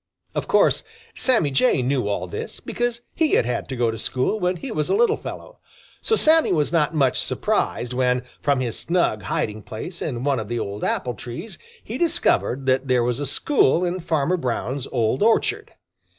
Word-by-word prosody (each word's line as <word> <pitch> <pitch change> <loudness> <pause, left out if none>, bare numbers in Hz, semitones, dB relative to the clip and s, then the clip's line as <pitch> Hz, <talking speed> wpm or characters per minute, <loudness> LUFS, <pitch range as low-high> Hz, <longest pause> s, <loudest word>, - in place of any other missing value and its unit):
Of - - -3
course - - +3 0.3
Sammy 225 - +2
Jay 135 - +3
knew 130 -3 0
all 100 -3 -1
this, 90 - -6
because 240 -1 -3
he 320 -3 +1
had - - +4
had 125 +1 -3
to 130 - -3
go 120 -2 +1
to 110 - -7
school 130 - 0
when 180 -1 +1
he 250 +8 -6
was 155 -7 -1
a - - +3
little 450 0 +4
fellow. - - -9 0.4
So 445 - +2
Sammy 320 -4 +5
was 155 -4 +1
not 165 -1 +1
much 135 -4 +2
surprised 120 +1 -1
when, 125 0 +1 0.2
from 140 -2 +1
his 120 -3 -2
snug 170 -11 +1
hiding 105 +1 -2
place 140 - -8
in 125 -5 -3
one 140 -3 +1
of 110 - -5
the 120 +2 -3
old 100 -2 -4
apple 125 - -1
trees, 120 - -8 0.2
he - - -6
discovered 325 - +1
that 130 +1 +1
there 125 -2 +3
was 120 +1 -1
a 145 - -2
school 180 - +2
in 180 +1 -2
Farmer 165 +1 0
Brown's 130 -1 -3
old 120 0 0
orchard. 420 - +2
140 Hz, 195 wpm, -23 LUFS, 120-185 Hz, 0.4 s, Sammy